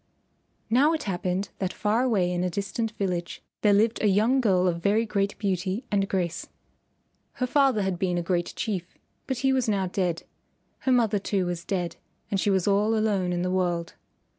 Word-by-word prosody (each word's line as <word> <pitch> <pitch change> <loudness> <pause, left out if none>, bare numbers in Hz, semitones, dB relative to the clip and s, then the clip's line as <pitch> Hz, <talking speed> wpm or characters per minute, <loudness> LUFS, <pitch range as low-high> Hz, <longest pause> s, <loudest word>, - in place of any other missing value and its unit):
Now 280 +7 +4
it 320 - -2
happened 185 0 -2
that 190 -2 -1
far 215 +5 0
away 205 -9 +2
in 175 0 -1
a 180 - 0
distant 200 +5 -2
village 180 -5 -3 0.2
there 210 - +4
lived 220 +3 +3
a 215 - +3
young 220 +7 +3
girl 185 -5 +3
of 170 -1 -1
very 210 +5 +2
great 200 -2 -1
beauty 195 +2 -2
and 195 -1 +1
grace. 170 -3 -2 0.9
Her 255 - -1
father 260 -5 +3
had 190 -2 -2
been 180 -2 0
a 175 - -1
great 175 0 -1
Chief, 185 -6 -4 0.3
but 265 - -1
he 265 - +4
was 255 -3 +1
now 195 -2 +1
dead. 180 -2 -1 0.6
Her 260 - 0
mother 225 -5 +3
too 195 -1 -1
was 175 -1 -3
dead, 175 -2 -3 0.3
and 200 - +1
she 205 - +1
was 190 -1 +1
all 205 +2 +3
alone 200 -4 +1
in 175 0 -1
the 180 - -1
world. 175 -2 -1
195 Hz, 190 wpm, -26 LUFS, 180-220 Hz, 0.9 s, Now